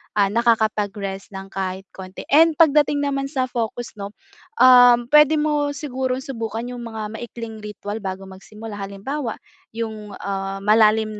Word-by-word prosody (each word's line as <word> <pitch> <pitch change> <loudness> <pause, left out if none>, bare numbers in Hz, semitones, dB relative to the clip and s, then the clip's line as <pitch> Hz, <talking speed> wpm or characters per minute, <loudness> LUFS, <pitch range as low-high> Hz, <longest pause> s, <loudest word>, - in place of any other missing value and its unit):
ah, 205 -1 +4
nakakapag-rest 210 -4 0
ng 195 0 -7
kahit 190 0 -4
konti. 185 0 -9
And 320 +2 +6
pagdating 295 -2 +4
naman 275 -1 -1
sa 260 -3 -1
focus 235 0 -4
'no, 200 0 -6 0.5
um, 245 -1 +7
puwede 300 +1 +6
mo 295 -1 0
sigurong 260 -2 -3
subukan 230 -3 -5
yung 245 -1 -7
mga 220 -1 -6
maikling 230 -2 -8
ritwal 210 0 -6
bago 190 0 -5
magsimula. 210 +3 -10
Halimbawa 215 +6 -4 0.4
yung, 220 -2 -5
ah, 195 0 -3
malalim 215 0 +3
225 Hz, 140 wpm, -21 LUFS, 205-260 Hz, 0.5 s, um